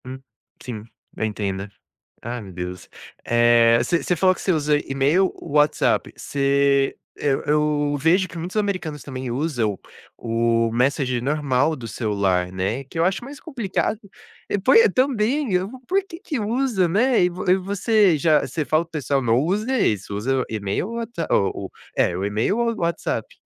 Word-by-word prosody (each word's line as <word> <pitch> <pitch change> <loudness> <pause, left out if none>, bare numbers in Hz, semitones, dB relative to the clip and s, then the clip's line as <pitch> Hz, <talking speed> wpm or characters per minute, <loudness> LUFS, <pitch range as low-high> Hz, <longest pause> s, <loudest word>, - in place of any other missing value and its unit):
Hum, 130 +1 -7 0.4
sim, 115 -4 -6 0.3
eu - - -4
entendo. 100 -2 -3 0.5
Ai, 120 +1 -4
meu 95 -2 -10
Deus. 90 0 -6 0.4
Eh, 120 0 +5
você 165 +7 0
você 180 - +1
falou 185 +2 +4
que - - -11
você 190 - +2
usa 150 -2 +2
e-mail 145 +7 +2
ou 160 - -10
WhatsApp, 150 +1 +2
você 140 0 +1 0.2
eu 140 -2 0
eu 150 -1 +1
vejo 180 +6 +3
que 170 - -11
muitos 175 +5 -6
americanos 185 -8 -2
também 130 -2 -6
usam 120 - -1 0.4
o 115 0 +1
messenger 125 0 +1
normal 145 +1 +1
do 120 -4 -8
celular, 100 -6 0
né, 100 +8 -2
que 140 - -9
eu 165 - +3
acho 195 +5 -1
mais 280 +2 -10
complicado. 220 - -2 0.5
É, - - +2
poi 455 - +6
também, 255 0 +1
eu 180 +1 +1 0.2
por 390 +2 +2
quê 335 -4 -10
que 295 -6 -3
usa, 225 -3 +1
né? 225 +4 +3
E - - +3
vo 180 +1 -2
e 185 - +6
você 200 -1 +2
já 155 +1 +4
você 145 +4 -3
fala 155 +5 +2
para - - -25
o - - -51
pessoal: 140 -3 -1
"Não 115 -1 +2
usa 210 - 0
isso, 100 - 0
usa 130 +6 0
o - - -1
e-mail 105 - -2
ou 230 - -6
what 230 0 -5 0.2
o 100 - +1
o - - -14 0.3
é, - - +2
o 95 - -3
e-mail 105 - 0
ou 235 -1 +1
WhatsApp". 170 - -2
150 Hz, 180 wpm, -22 LUFS, 120-190 Hz, 0.5 s, poi